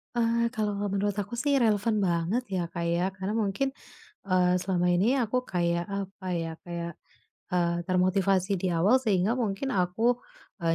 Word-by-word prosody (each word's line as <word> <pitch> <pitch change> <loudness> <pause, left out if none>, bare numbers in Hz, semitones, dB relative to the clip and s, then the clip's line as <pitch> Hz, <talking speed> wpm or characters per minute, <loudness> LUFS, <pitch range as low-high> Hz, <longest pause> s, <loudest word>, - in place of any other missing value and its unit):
Eee, 235 0 +2
kalau 215 -1 0 0.2
menurut 200 +1 0
aku 205 +3 -4
sih 275 +3 +2
relevan 215 -2 +2
banget 180 +5 +1
ya, 180 -3 -2
Kak, 170 -1 -2
ya 175 +3 +1
karena 190 +3 -4
mungkin, 225 +6 0 0.5
eee, 180 -2 +3
selama 180 -1 0
ini 200 +10 +3
aku 250 +1 0
kayak, 170 -5 0
apa 195 -1 -5
ya, 165 -2 -2
kayak, 170 -1 -5 0.6
eee, 170 -1 +2
termotivasi 185 +1 +2
di 185 - 0
awal 185 +9 +3
sehingga 205 -3 +2
mungkin 235 +4 -1
aku, 225 +6 +1 0.4
eee, 165 -1 +2
195 Hz, 155 wpm, -28 LUFS, 175-225 Hz, 0.6 s, eee